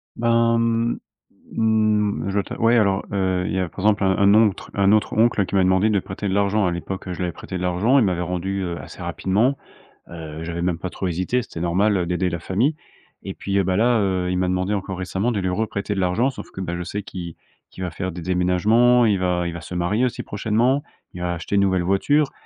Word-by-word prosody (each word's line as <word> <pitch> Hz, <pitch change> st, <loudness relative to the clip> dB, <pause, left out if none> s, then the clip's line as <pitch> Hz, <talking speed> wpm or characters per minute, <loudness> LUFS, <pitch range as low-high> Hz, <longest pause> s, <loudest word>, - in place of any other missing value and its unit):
Ben, 115 Hz, 0 st, +2 dB
hem 115 Hz, 0 st, 0 dB, 0.6 s
hem, 110 Hz, -2 st, +2 dB
je 100 Hz, -, -2 dB
dois 100 Hz, -1 st, +1 dB
t'av -, -, -8 dB
ouais, 115 Hz, +1 st, +4 dB
alors, 100 Hz, -3 st, +2 dB
heu, 95 Hz, -2 st, 0 dB
il -, -, -3 dB
y 95 Hz, -, 0 dB
a, 90 Hz, -, 0 dB
par 95 Hz, -, -12 dB
exemple, 105 Hz, 0 st, +2 dB
un 95 Hz, -1 st, +3 dB
un 100 Hz, +1 st, +5 dB
ontre 110 Hz, -3 st, +2 dB
un 100 Hz, 0 st, +3 dB
autre 110 Hz, 0 st, +2 dB
oncle 110 Hz, -3 st, +3 dB
qui 100 Hz, -, -4 dB
m'a 95 Hz, -, +4 dB
demandé 95 Hz, +4 st, +3 dB
de 100 Hz, -2 st, +2 dB
prêter 95 Hz, +3 st, -5 dB
de -, -, -1 dB
l'argent. 100 Hz, 0 st, +2 dB
À -, -, 0 dB
l'époque, 95 Hz, +3 st, -5 dB
je 90 Hz, -, -5 dB
lui 90 Hz, -, -3 dB
avais 90 Hz, -, -1 dB
prêté 90 Hz, +3 st, -7 dB
de -, -, -6 dB
l'argent. 90 Hz, +9 st, +2 dB
Il 120 Hz, -, +4 dB
m'avait 90 Hz, -2 st, 0 dB
rendu, 90 Hz, +2 st, -2 dB
heu, 85 Hz, -1 st, -3 dB
assez -, -, -10 dB
rapidement. 110 Hz, +9 st, 0 dB, 0.5 s
Heu, 80 Hz, -1 st, -7 dB
j'avais 85 Hz, +1 st, -4 dB
même 85 Hz, -2 st, -1 dB
pas 95 Hz, -, -4 dB
trop 95 Hz, -, -4 dB
hésité. 90 Hz, +9 st, 0 dB
C'était 85 Hz, -, -9 dB
normal, 95 Hz, +5 st, +2 dB
heu, 90 Hz, -, 0 dB
d'aider 90 Hz, +1 st, 0 dB
la 85 Hz, -1 st, -4 dB
famille 115 Hz, -, 0 dB, 0.5 s
et -, -, -3 dB
puis, 100 Hz, 0 st, -3 dB
heu, 100 Hz, -, +3 dB
bah 95 Hz, 0 st, 0 dB
là, 120 Hz, +4 st, +3 dB
heu, 95 Hz, -2 st, 0 dB
il 90 Hz, -, 0 dB
m'a 90 Hz, -, +1 dB
demandé 95 Hz, +3 st, 0 dB
encore 95 Hz, -1 st, -4 dB
récemment 95 Hz, +6 st, -1 dB
de 105 Hz, -, -1 dB
lui 95 Hz, -1 st, -1 dB
reprêter 100 Hz, +1 st, -2 dB
de -, -, -2 dB
l'argent 95 Hz, +9 st, +1 dB
sauf -, -, -9 dB
que, 95 Hz, -, -7 dB
bah, 85 Hz, -1 st, -3 dB
je 90 Hz, -, -4 dB
sais 100 Hz, +4 st, -4 dB
qu'il 85 Hz, -4 st, -7 dB, 0.4 s
qu'il 95 Hz, -, -7 dB
va 90 Hz, -, -2 dB
faire 95 Hz, +3 st, -4 dB
des 85 Hz, +1 st, -7 dB
déménagements, 105 Hz, +8 st, +3 dB
il 105 Hz, -3 st, +3 dB
va 90 Hz, -1 st, 0 dB
il 85 Hz, -, -3 dB
va 85 Hz, -, -6 dB
se 80 Hz, -, -9 dB
marier 100 Hz, +8 st, +1 dB
aussi 125 Hz, -, -3 dB
prochainement, 115 Hz, +7 st, 0 dB, 0.3 s
il 90 Hz, -, -8 dB
va 90 Hz, 0 st, -1 dB
acheter 85 Hz, +4 st, -4 dB
une 100 Hz, -, +4 dB
nouvelle 95 Hz, -2 st, +2 dB
voiture 135 Hz, -, +2 dB
95 Hz, 250 wpm, -22 LUFS, 90-110 Hz, 0.6 s, un